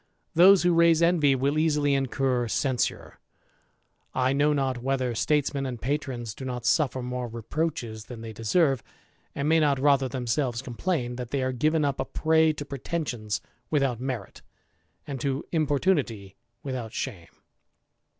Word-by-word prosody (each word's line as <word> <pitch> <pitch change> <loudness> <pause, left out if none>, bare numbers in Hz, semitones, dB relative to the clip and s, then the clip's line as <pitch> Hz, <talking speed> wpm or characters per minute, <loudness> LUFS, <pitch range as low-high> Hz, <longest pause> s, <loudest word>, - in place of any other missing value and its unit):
Those 185 +3 +7
who 175 0 +4
raise 170 0 +5
envy 160 -5 +4
will 140 +4 +1
easily 150 -3 +2
incur 135 -2 0
censure. 130 +1 -1 1.0
I 130 +1 +2
know 145 +2 +3
not 135 -4 0
whether 130 -1 0
statesmen 140 +2 0
and 125 -2 -5
patrons 125 -4 -3
do 130 - -9
not 125 -2 -4
suffer 130 -5 +2
more 125 0 -3
reproaches 115 -1 -3
than 120 -3 -9
they 115 -1 -7
deserve, 135 - +2 0.5
and 140 +1 -1
may 160 +1 +4
na^ 145 -3 +2
rather 140 -1 +3
themselves 125 0 -1
complain, 125 -1 -2
that 125 -2 -5
they 135 0 -1
are 130 - 0
given 155 +4 +1
up 140 -1 -1
a - - -1
prey 160 +3 +3
to 145 -1 -6
pretensions 135 -7 -3 0.3
without 135 -6 +1
merit, 125 -7 -5 0.6
and 140 -5 -5
to 135 0 -2
importunity 145 - 0 0.3
without 125 -5 -5
shame. 95 -11 -5
135 Hz, 150 wpm, -26 LUFS, 125-150 Hz, 1.0 s, Those